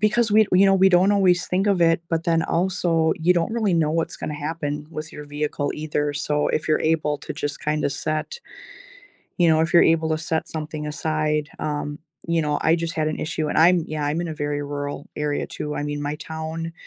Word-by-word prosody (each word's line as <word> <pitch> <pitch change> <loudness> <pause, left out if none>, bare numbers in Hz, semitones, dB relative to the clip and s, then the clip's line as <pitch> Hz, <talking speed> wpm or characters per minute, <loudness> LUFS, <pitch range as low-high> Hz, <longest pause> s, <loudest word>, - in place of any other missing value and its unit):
Because 215 +2 +2
we 215 +1 +5
you 190 +2 +6
know, 195 - +5
we 190 0 +5
don't 190 +2 +4
always 185 -3 +3
think 190 +3 0
of 200 -3 +2
it, 165 0 +3
but 165 -1 0
then 165 -1 +2
also, 170 -2 +1
you 175 +3 +4
don't 170 +4 0
really 215 -6 +1
know 155 -2 +2
what's 165 +1 -1
gonna 150 - -5
happen 150 0 -4
with 155 0 -7
your 150 - -8
vehicle 145 0 -2
either, 150 -1 -2
so 150 0 0
if 155 - -1
you're 155 - +2
able 155 -2 +1
to - - -6
just 145 0 -4
kinda 150 -1 0
set, 155 - -3 1.0
you 175 - +4
know, 160 -1 +4
if 165 - -1
you're 170 - +7
able 160 -1 +2
to 155 - +1
set 160 0 -2
something 155 -1 -5
aside 150 -1 -1
um, 145 -1 -3 0.3
you 170 -1 +2
know, 150 -1 0
I 160 - +4
just 170 0 -3
had 155 -2 0
an 155 - -3
issue, 155 -1 -2
and - - -2
I'm 170 0 +5
yeah, 155 -1 -3
I'm 150 +3 -1
in 175 - -3
a 160 - -4
very 145 -1 -2
rural 145 0 -5
area 150 -1 -1
too. 150 0 -5
I - - -2
mean, 145 0 -3
my 145 +1 -2
town, 160 +1 -5
160 Hz, 225 wpm, -23 LUFS, 150-170 Hz, 1.0 s, you're